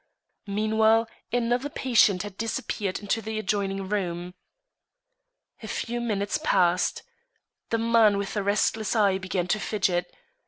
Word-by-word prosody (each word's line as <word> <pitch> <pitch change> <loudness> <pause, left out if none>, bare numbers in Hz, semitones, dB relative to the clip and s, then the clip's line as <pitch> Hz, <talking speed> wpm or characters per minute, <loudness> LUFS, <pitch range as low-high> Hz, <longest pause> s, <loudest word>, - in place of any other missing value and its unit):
Meanwhile, 220 +2 +2 0.2
another 245 +3 0
patient 220 -9 +3
had 205 -2 -8
disappeared 210 -3 -3
into 210 +2 -2
the 220 0 -4
adjoining 195 -2 -1
room. 180 -3 -3 1.3
A - - -7
few 240 0 -3
minutes 205 0 -1
passed. 180 - +2 0.7
The 230 - +1
man 225 -2 +4
with 200 -1 -3
the 210 - -1
restless 210 +2 0
eye 200 -3 +3
began 185 -1 -2
to 215 - +1
fidget. 185 -4 -1
210 Hz, 125 wpm, -26 LUFS, 195-225 Hz, 1.3 s, man